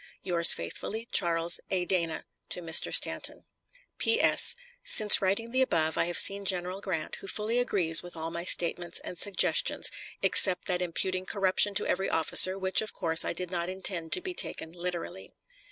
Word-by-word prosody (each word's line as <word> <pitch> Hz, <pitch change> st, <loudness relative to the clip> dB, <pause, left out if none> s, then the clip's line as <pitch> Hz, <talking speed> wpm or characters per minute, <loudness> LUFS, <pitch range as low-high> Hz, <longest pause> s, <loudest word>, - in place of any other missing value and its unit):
Yours 170 Hz, -2 st, +5 dB
faithfully, 220 Hz, -, -3 dB
CHARLES 170 Hz, 0 st, 0 dB
A. 185 Hz, -2 st, -3 dB
DANA. 170 Hz, -3 st, -3 dB, 0.3 s
Mr. 165 Hz, -2 st, +2 dB
STANTON. -, -, +1 dB, 0.6 s
P.S. 455 Hz, +1 st, +4 dB, 0.3 s
Since 220 Hz, -, +5 dB
writing 200 Hz, +5 st, -3 dB
the 260 Hz, +1 st, -1 dB
above 160 Hz, -10 st, -2 dB
I -, -, -1 dB
have 175 Hz, 0 st, -5 dB
seen 200 Hz, 0 st, +6 dB
General 185 Hz, 0 st, -2 dB
Grant, 170 Hz, -6 st, -6 dB
who -, -, -14 dB
fully 220 Hz, +5 st, -3 dB
agrees 180 Hz, -9 st, +3 dB
with 175 Hz, -1 st, -10 dB
all 160 Hz, +1 st, -7 dB
my 170 Hz, +1 st, -7 dB
statements 175 Hz, -1 st, +2 dB
and -, -, -9 dB
suggestions, 200 Hz, -2 st, 0 dB, 0.3 s
except 185 Hz, -2 st, +2 dB
that 180 Hz, -1 st, -4 dB
imputing 185 Hz, +1 st, -5 dB
corruption 195 Hz, +1 st, -1 dB
to -, -, -1 dB
every 190 Hz, -, -3 dB
officer, 185 Hz, +3 st, +3 dB
which 190 Hz, -1 st, 0 dB
of 215 Hz, -, -9 dB
course 160 Hz, 0 st, +1 dB
I -, -, -4 dB
did 180 Hz, +1 st, -4 dB
not 175 Hz, -1 st, -4 dB
intend 185 Hz, -3 st, -1 dB
to -, -, +1 dB
be 370 Hz, 0 st, -7 dB
taken 160 Hz, -, -3 dB
literally. 175 Hz, -, -7 dB
180 Hz, 170 wpm, -26 LUFS, 170-195 Hz, 0.6 s, seen